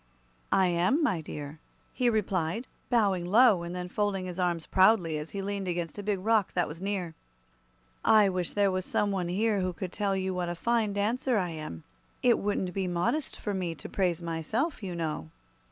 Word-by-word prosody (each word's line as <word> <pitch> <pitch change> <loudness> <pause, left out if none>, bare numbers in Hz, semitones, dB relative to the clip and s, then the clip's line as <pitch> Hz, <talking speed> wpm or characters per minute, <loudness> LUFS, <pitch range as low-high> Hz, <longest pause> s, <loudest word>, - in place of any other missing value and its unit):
"I 190 - +4
am, 180 - +2
my 185 - +1
dear," 150 0 -7 0.3
he 250 -2 +2
replied, 200 -1 0 0.2
bowing 200 -7 +2
low 210 +1 +5
and 170 +1 -5
then 180 0 -4
folding 195 0 -1
his 180 0 -6
arms 175 -3 0
proudly 185 -5 +4
as 150 +1 -6
he 200 -1 -4
leaned 200 -1 -3
against 175 +1 -3
a - - -2
big 205 0 0
rock 210 +1 +1
that 175 - +1
was 160 +4 -8
near. 190 -4 -2 0.9
"I 215 -2 +6
wish 180 -2 -2
there 200 -1 +3
was 185 0 -1
some 205 +2 0
one 185 -3 -1
here 205 +3 +1
who 185 -1 -1
could 180 +1 -5
tell 200 -1 0
you 190 0 -1
what 180 -1 -2
a 175 - -3
fine 225 +2 +1
dancer 230 +4 +1
I 180 -4 0
am. 155 - -7 0.4
It 245 -2 +5
wouldn't 195 -3 -1
be 190 -2 -1
modest 180 - -1
for 205 - -3
me 180 -3 -2
to - - -8
praise 180 -3 0
myself, 170 - -2
you 185 -4 -4
know." 155 - -3
185 Hz, 200 wpm, -29 LUFS, 175-205 Hz, 0.9 s, I